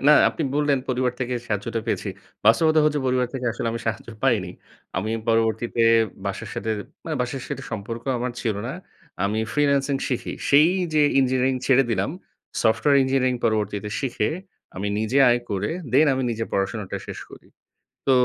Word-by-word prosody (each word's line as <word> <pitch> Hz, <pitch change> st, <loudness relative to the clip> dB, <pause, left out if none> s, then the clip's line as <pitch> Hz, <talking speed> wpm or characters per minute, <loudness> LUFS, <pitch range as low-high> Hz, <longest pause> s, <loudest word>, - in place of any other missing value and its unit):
"না -, -, +9 dB, 0.2 s
আপনি -, -, -4 dB
বললেন 145 Hz, -2 st, +2 dB
পরিবার 125 Hz, -1 st, +1 dB
থেকে 125 Hz, 0 st, -1 dB
সাহায্যটা 115 Hz, +2 st, -2 dB
পেয়েছি, 110 Hz, -, -1 dB, 0.4 s
বাস্তবতা 155 Hz, +8 st, +5 dB
হচ্ছে 150 Hz, -1 st, +2 dB
পরিবার 125 Hz, -1 st, +2 dB
থেকে 130 Hz, -2 st, -3 dB
আসলে 115 Hz, -, -4 dB
আমি 115 Hz, -, -4 dB
সাহায্য 110 Hz, +1 st, -3 dB
পাইনি।" 110 Hz, -9 st, +2 dB, 0.5 s
আমি 100 Hz, +4 st, -1 dB, 0.2 s
পরবর্তীতে 115 Hz, +1 st, +1 dB, 0.5 s
বাসার 100 Hz, -, -4 dB
সাথে 110 Hz, -, -3 dB, 0.3 s
মানে 160 Hz, -2 st, -2 dB
বাসার 125 Hz, +1 st, -4 dB
সাথে 140 Hz, -1 st, -4 dB
সম্পর্ক 115 Hz, +2 st, -5 dB, 0.2 s
আমার 125 Hz, +1 st, -2 dB
ছিল 110 Hz, -4 st, 0 dB
না। -, -, -3 dB, 0.5 s
আমি 105 Hz, +2 st, 0 dB
ফ্রিল্যান্সিং 140 Hz, -1 st, +2 dB
শিখি। 125 Hz, -, -2 dB, 0.2 s
সেই 150 Hz, +3 st, +7 dB, 0.3 s
যে 155 Hz, -, +5 dB, 0.2 s
ইঞ্জিনিয়ারিং 130 Hz, 0 st, +2 dB
ছেড়ে 135 Hz, 0 st, +5 dB
দিলাম, 100 Hz, +1 st, 0 dB, 0.5 s
সফটওয়্যার 130 Hz, +5 st, +4 dB
ইঞ্জিনিয়ারিং 130 Hz, -1 st, +1 dB
পরবর্তীতে 105 Hz, -2 st, 0 dB
শিখে 120 Hz, -5 st, -1 dB, 0.5 s
আমি 100 Hz, +2 st, -2 dB
নিজে 110 Hz, +5 st, +1 dB
আয় 120 Hz, 0 st, +3 dB
করে 100 Hz, 0 st, -1 dB, 0.2 s
দেন 145 Hz, +5 st, +6 dB
আমি 130 Hz, -, -1 dB
নিজের 115 Hz, 0 st, -2 dB
পড়াশোনাটা 100 Hz, +1 st, -2 dB
শেষ -, -, -7 dB
করি। -, -, -14 dB, 0.6 s
তো -, -, +5 dB
120 Hz, 160 wpm, -24 LUFS, 110-135 Hz, 0.6 s, না